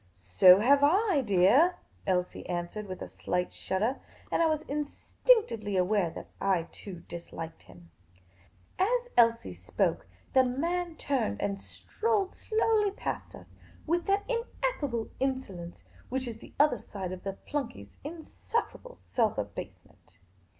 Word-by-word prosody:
" 90 - -34 0.3
So 185 0 +10
have 280 +5 +6
I, 355 +2 +4
dear," 220 - +5 0.3
Elsie 180 -1 -1
answered, 175 +4 -3
with 185 -1 -6
a - - -6
slight 95 - -2
shudder. 215 +8 -1 0.3
And - - +2
I 330 - +5
was 310 -1 +1
instinctively 285 - +1
aware 185 -1 +2
that - - -8 0.2
I 190 -3 +2
too 180 -4 -9
disliked 165 -1 -7
him. 85 -2 -17 0.9
As 485 +5 +2
Elsie 230 - +4
spoke, 90 0 -1 0.3
the 260 - +6
man 335 +7 -1
turned, 260 - -1
and 200 -1 -2
strolled 430 -4 -1
slowly 435 -1 +2
past 395 - -5
us, - - -14 0.3
with 340 +3 0
that 400 +1 +2
ineffable 465 - -2
insolence 230 -11 -3 0.3
which 260 0 -2
is 225 -1 -6
the - - -14
other 290 -6 +4
side 190 -3 -6
of 185 -1 -6
the 195 - -3
flunkey's 180 - -4
insufferable 395 - -4 0.2
self 225 -4 +2
abasement. 100 0 -8
245 Hz, 135 wpm, -30 LUFS, -, 0.9 s, So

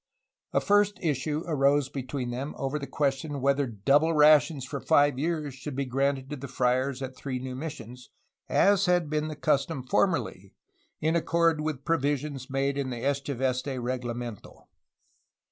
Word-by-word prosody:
A - - +3
first 205 0 +3
issue 150 0 -1
arose 145 -3 +2
between 130 -2 -4
them 130 +4 -4
over 135 +2 -2
the 140 - -6
question 140 0 -1
whether 140 +1 +2
double 140 +9 +2
rations 150 -2 +5
for 130 - -5
five 145 -4 +3
years 155 -2 -2
should 135 +1 -7
be 140 +1 -1
granted 135 +1 0
to - - -2
the 140 +1 -7
friars 130 +2 0
at 130 0 -6
three 130 -1 -4
new 130 0 -5
missions, 125 -4 -8 0.4
as 200 -1 +4
had 175 -4 +2
been 155 0 0
the 155 - -5
custom 145 -1 0
formerly, - - 0 0.5
in 160 +2 +1
accord 165 -1 +2
with 150 -3 -4
provision 145 -2 0
made 135 +1 0
in 135 -2 -2
the 120 -2 -5
Echeveste 135 -1 -1
reglamento. 120 -2 -5
140 Hz, 155 wpm, -27 LUFS, 130-150 Hz, 0.5 s, rations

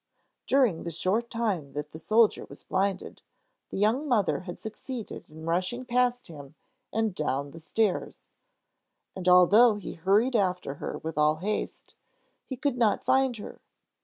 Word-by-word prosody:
During 250 -11 +3
the 170 - -4
short 190 +8 -1
time 195 - -2
that 150 +1 -5
the 160 - -9
soldier 215 +5 +3
was - - -12
blinded, 190 0 -2 0.5
the - - -5
young 225 +9 +1
mother 220 -8 +2
had 180 -1 -8
succeeded 220 +1 -7
in 160 +1 -11
rushing 185 +9 -1
past 245 0 +1
him 145 -2 -11 0.4
and 220 -2 0
down 140 -3 -2
the 165 - -11
stairs; 200 +4 -1 0.9
and 185 -1 -5
although 200 +6 +7
he 205 - -7
hurried 205 +9 +2
after 180 -8 0
her - - -4
with 160 -1 -4
all 150 0 +4
haste, 200 +7 -4 0.5
he 260 - -5
could 280 -2 -1
not 220 -4 +2
find 265 -2 +2
her. 205 - -10
200 Hz, 155 wpm, -27 LUFS, 165-235 Hz, 0.9 s, although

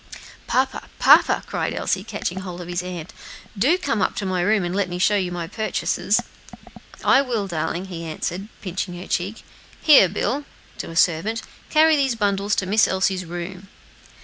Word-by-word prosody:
"Papa, - - 0
papa," - - +5
cried - - -2
Elsie, 190 - -1
catching 205 -4 -4
hold 180 -2 -7
of 175 - -7
his 175 0 -2
hand, 180 -2 -7 0.4
"do 270 - +3
come 230 - -1
with - - +2
me - - -20
to 205 - -3
my 185 -1 0
room, 205 +2 +2
and 175 +1 -2
let 200 -2 0
me 175 - -4
show 205 +3 +3
you 185 -3 0
my 175 -1 -3
purchases." 215 +5 0 0.8
"I 265 - +5
will, 240 -7 -2
darling," 175 0 -3
he 175 -3 -7
answered, 175 +4 -4 0.2
pinching 180 -1 -4
her 180 - -8
cheek, 195 +5 -3 0.3
"Here, 280 - +7
Bill" 260 +9 -1 0.4
to - - -5
a 165 - -8
servant 180 +7 +2 0.3
"carry 315 0 +5
these 270 -4 +1
bundles 200 -1 0
to 185 - -1
Miss 210 +3 +4
Elsie's 190 -1 0
room." 175 +3 -7
190 Hz, 180 wpm, -22 LUFS, 175-215 Hz, 0.8 s, Here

